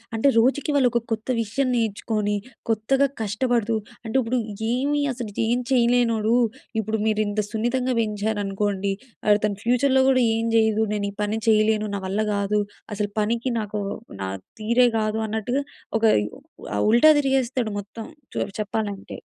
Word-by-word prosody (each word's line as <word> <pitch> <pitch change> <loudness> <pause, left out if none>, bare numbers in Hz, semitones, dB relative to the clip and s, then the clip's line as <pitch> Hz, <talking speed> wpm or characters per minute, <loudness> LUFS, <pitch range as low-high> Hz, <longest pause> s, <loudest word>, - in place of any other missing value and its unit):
అంటే, 225 +5 +2
రోజుకి 270 +5 +2
వాళ్ళు 260 -3 +4
ఒక 240 - +2
కొత్త 220 0 -2
విషయం 240 +5 -1
నేర్చుకొని, 215 -2 -1 0.3
కొత్తగా 245 +6 +2
కష్టపడుతూ 230 +1 0 0.3
అంటే, 225 - -5
ఇప్పుడు 245 +1 0 0.3
ఏమి 285 +4 +1
అసలు 240 -4 -6 0.2
ఏం 240 +2 +2
చేయలేనోడు, 235 -3 +3 0.5
ఇప్పుడు 220 +1 -2
మీరు 215 -1 +2
ఇంత 205 +1 -2
సున్నితంగా 250 +3 0
పెంచారనుకోండి, 205 -2 -1 0.4
అతను 210 0 0
ఫ్యూచర్‍లో 260 +3 +3
కూడా 260 -1 +4
"ఏం 225 0 -1
చేయను. 220 -1 +3
నేను 205 -1 -1
ఈ - - -17
పని 210 +1 -1
చేయలేను. 215 -1 +3
నా - - -2
వల్ల 195 +3 -2 0.2
కాదు, 200 +1 +1 0.3
అసలు 205 0 -2
పనికి 235 +4 0
నాకు 210 -1 -3 0.4
నా 95 - -2 0.3
తీరే 235 +3 +4
కాదు." 215 0 -1
అన్నట్టుగా 220 +6 -1 0.4
ఒక - - -10 0.7
ఆహ్, 105 - +1
ఉల్టా 240 +7 +7
తిరిగేస్తాడు 260 -4 0
మొత్తం, 205 +3 -11 0.4
చె - - -2 0.2
చెప్పాలంటే. 205 -1 -3
220 Hz, 145 wpm, -24 LUFS, 210-245 Hz, 0.7 s, ఉల్టా